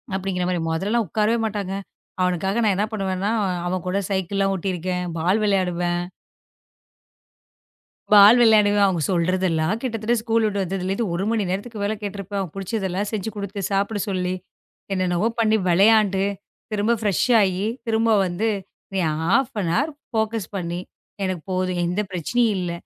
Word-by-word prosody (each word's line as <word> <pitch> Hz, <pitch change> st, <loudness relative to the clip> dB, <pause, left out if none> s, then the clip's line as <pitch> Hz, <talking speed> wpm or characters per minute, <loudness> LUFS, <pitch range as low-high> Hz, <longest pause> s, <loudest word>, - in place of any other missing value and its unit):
அப்டிங்குற 185 Hz, -1 st, -2 dB
மாரி. 175 Hz, -2 st, -1 dB
மொதல்லலாம் 210 Hz, +7 st, 0 dB
உக்காரவே 215 Hz, +6 st, +1 dB
மாட்டாங்க. 200 Hz, -3 st, -4 dB, 0.5 s
அவனுக்காக 190 Hz, +5 st, 0 dB
நான் 210 Hz, -2 st, +3 dB
என்ன 210 Hz, -, +2 dB
பண்ணுவேன்னா 195 Hz, -2 st, -1 dB, 0.4 s
அவன் 185 Hz, 0 st, -2 dB
கூட 185 Hz, -, 0 dB
சைக்கிள்லாம் 195 Hz, +1 st, 0 dB
ஓட்டி 190 Hz, +2 st, -3 dB
இருக்கேன். 180 Hz, +1 st, -2 dB
பால்l 180 Hz, +6 st, +2 dB
விளையாடுவேன். 175 Hz, -3 st, +1 dB, 2.1 s
பால் 210 Hz, +3 st, +9 dB
விளையாடுவேன். 205 Hz, -3 st, +5 dB
அவங்க 175 Hz, -4 st, 0 dB
சொல்றதெல்லாம் 180 Hz, +1 st, +1 dB
கிட்டத்தட்ட 230 Hz, -2 st, -1 dB
ஸ்கூல் 225 Hz, -1 st, +1 dB
விட்டு 205 Hz, -2 st, 0 dB
வந்ததுல 190 Hz, 0 st, -3 dB
இருந்து 215 Hz, +3 st, -1 dB
1 175 Hz, +3 st, -1 dB
மணி 220 Hz, -3 st, +1 dB
நேரத்துக்கு 205 Hz, +3 st, -4 dB
மேல 210 Hz, +2 st, 0 dB
கேட்டு 205 Hz, -1 st, -5 dB
இருப்பேன். 200 Hz, +1 st, -4 dB
அவன் 180 Hz, -5 st, -6 dB
புடிச்சதெல்லாம் 195 Hz, 0 st, -2 dB
செஞ்சு 215 Hz, 0 st, -2 dB
கொடுத்து 200 Hz, -1 st, -5 dB
சாப்பிட 200 Hz, +2 st, 0 dB
சொல்லி 180 Hz, -1 st, -1 dB, 0.6 s
என்னென்னவோ 185 Hz, +2 st, +1 dB
பண்ணி 220 Hz, -1 st, +3 dB
விளையாண்டு 195 Hz, +1 st, +4 dB, 0.5 s
திரும்ப 215 Hz, +3 st, +1 dB
ஃப்ரெஷ் 205 Hz, -5 st, +1 dB, 0.2 s
ஆயி 190 Hz, 0 st, +1 dB, 0.2 s
திரும்ப 225 Hz, 0 st, +2 dB, 0.2 s
வந்து 185 Hz, +5 st, -1 dB, 0.4 s
நீ 190 Hz, -, 0 dB, 0.2 s
ஹாஃப் 225 Hz, +10 st, +2 dB
அன் 165 Hz, -2 st, -1 dB
ஹார் 300 Hz, +3 st, +1 dB, 0.2 s
ஃபோகஸ் 220 Hz, -3 st, -1 dB
பண்ணி 175 Hz, -1 st, -3 dB, 0.4 s
எனக்குப் 185 Hz, -1 st, -3 dB
போதும். 185 Hz, -1 st, -1 dB
எந்தப் 185 Hz, +3 st, -2 dB
பிரச்சனையும் 215 Hz, +5 st, +1 dB
இல்ல. 175 Hz, -1 st, -2 dB
195 Hz, 145 wpm, -23 LUFS, 180-215 Hz, 2.1 s, பால்